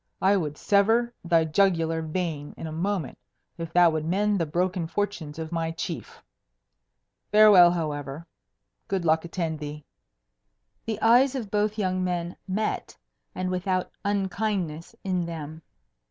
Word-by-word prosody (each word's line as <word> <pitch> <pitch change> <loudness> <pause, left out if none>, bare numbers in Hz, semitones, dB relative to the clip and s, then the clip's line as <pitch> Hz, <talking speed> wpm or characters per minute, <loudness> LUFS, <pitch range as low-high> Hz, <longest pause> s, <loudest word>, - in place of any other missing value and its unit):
I 195 +2 +4
would 150 -6 -2
sever 225 +4 +2
thy 165 -2 +3
jugular 165 -1 +2
vein 160 -2 -4
in - - -6
a 160 - -5
moment 175 -1 -2 0.4
if 165 -1 -5
that 175 -2 +6
would 155 -1 -1
mend 200 +4 +1
the 165 - 0
broken 175 +2 -1
fortunes 175 -5 -3
of 160 0 -5
my 165 -1 -1
chief. 165 - -6 1.1
Farewell, 210 -5 +8
however. 150 -3 -3 0.6
Good 190 -3 -1
luck 160 +1 +2
attend 165 -3 -3
thee." 150 0 -7 1.0
The 220 -2 -2
eyes 250 +4 +5
of 225 -7 -4
both 210 +1 0
young 185 -2 0
men 175 -1 -2
met, 210 +3 -2 0.4
and 185 0 -2
without 185 0 -1
unkindness 195 -5 -2
in 185 -2 0
them. 160 -1 -7
175 Hz, 140 wpm, -26 LUFS, 160-200 Hz, 1.1 s, Farewell